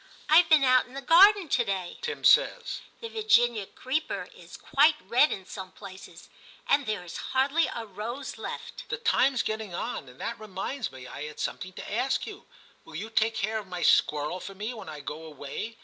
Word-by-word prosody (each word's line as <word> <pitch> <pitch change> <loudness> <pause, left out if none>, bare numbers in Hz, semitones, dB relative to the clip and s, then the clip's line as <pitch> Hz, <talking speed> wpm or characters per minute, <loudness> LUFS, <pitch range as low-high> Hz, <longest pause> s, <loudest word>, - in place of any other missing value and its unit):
* - - -24
I've 330 +2 +6
been 310 -3 +6
out 255 -1 +4
in 255 - -15
the 275 - -5
garden 385 +5 +7
to 255 -4 +2
day,' 190 -4 -4
Tim 470 -1 -4
says; - - +4
* - - -33
the 460 - -4
Virginia 240 - +2
creeper 295 - -3
is - - -12
quite 300 +3 +4
red 270 +6 +3
in 190 - -5
some 190 -1 -8
places, 195 -1 -12 0.4
and 280 -1 +2
there 210 -4 -2
is 170 - -7 0.2
hardly 285 +5 +3
a 230 - -5
rose 220 +6 -6
left' - - -7
' - - -30
The - - -2
time's 275 - +2
getting 215 -4 -4
on, 200 - -4
and 125 - -17
that 230 -1 -4
reminds 215 +5 -4
me 130 -1 -11
I 140 - -7
had 150 0 -9
something 185 0 -4
to 200 - -8
ask 255 +4 0
you: - - -10 0.4
will 160 - -13
you 215 +7 -5
take 225 0 +2
care 220 +2 -1
of 205 - -10
my 180 -1 -5
squirrel 150 +4 +3
for 195 +2 -9
me 215 +5 -4
when 225 - -9
I 150 -1 -8
go 150 +3 -7
away 155 +9 -7
225 Hz, 210 wpm, -28 LUFS, 185-275 Hz, 0.4 s, garden